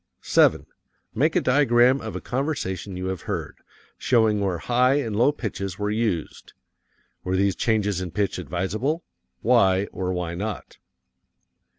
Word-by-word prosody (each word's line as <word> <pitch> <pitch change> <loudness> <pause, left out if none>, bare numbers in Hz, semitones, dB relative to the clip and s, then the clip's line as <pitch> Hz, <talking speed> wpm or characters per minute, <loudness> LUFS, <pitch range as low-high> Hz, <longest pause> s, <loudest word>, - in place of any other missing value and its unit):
7. - - +3 0.5
Make - - +1
a - - +3
diagram 125 -1 +4
of - - -6
a - - -4
conversation 100 - -3
you 90 - -4
have 95 -2 -4
heard, - - -4 0.4
showing 110 -4 +3
where 95 -3 -1
high 125 +8 +2
and 115 -8 -1
low 120 +7 +4
pitches 100 -8 -5
were 105 0 -2
used. 105 -7 -3 0.7
Were 90 +1 -1
these 95 -1 +2
changes 105 -4 0
in 90 - -4
pitch 100 +3 -1
advisable? 110 - -2 0.4
Why 100 -5 +4
or 90 -1 -3
why 90 -2 -3
not? 105 +4 -6
105 Hz, 145 wpm, -24 LUFS, 95-120 Hz, 0.7 s, diagram